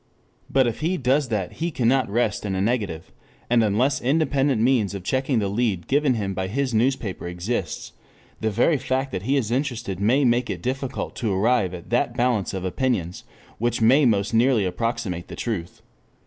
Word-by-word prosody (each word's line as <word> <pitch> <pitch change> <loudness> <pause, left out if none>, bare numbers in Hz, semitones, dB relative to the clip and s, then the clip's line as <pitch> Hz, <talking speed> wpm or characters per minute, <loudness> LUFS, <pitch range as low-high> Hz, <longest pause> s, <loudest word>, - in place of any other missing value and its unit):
But 135 -1 +3
if 120 -2 -2
he 170 +4 0
does 135 +1 +1
that 105 -6 -2
he 170 +2 -3
cannot 130 -4 +1
rest 110 0 0
in 100 -2 -2
a - - -1
negative, 100 -6 -1 0.4
and 120 -2 +5
unless 115 +7 +1
independent 140 -2 +1
means 115 -4 +2
of 95 - -6
checking 130 +4 0
the 105 -3 +1
lead 100 -4 -1
given 140 -2 +2
him 100 -3 -2
by 95 0 -2
his 130 +5 -1
newspaper 115 -6 0
exists, 90 +1 -3 0.5
the 110 - 0
very 120 +9 +2
fact 130 +1 -2
that 95 - -3
he 135 +8 +1
is 115 -5 -1
interested 120 - -2
may 125 +8 +3
make 120 +1 +2
it - - -4
difficult 130 +1 -3
to 110 -4 -1
arrive 100 -1 +1
at 85 +5 -11
that 120 0 +1
balance 120 -5 +1
of 95 -1 -4
opinions 95 -4 -2 0.3
which 120 +1 0
may 130 +6 +5
most 100 -1 +1
nearly 115 -2 +3
approximate 100 -3 -3
the - - -8
truth. 100 -8 -4
120 Hz, 185 wpm, -23 LUFS, 100-130 Hz, 0.5 s, and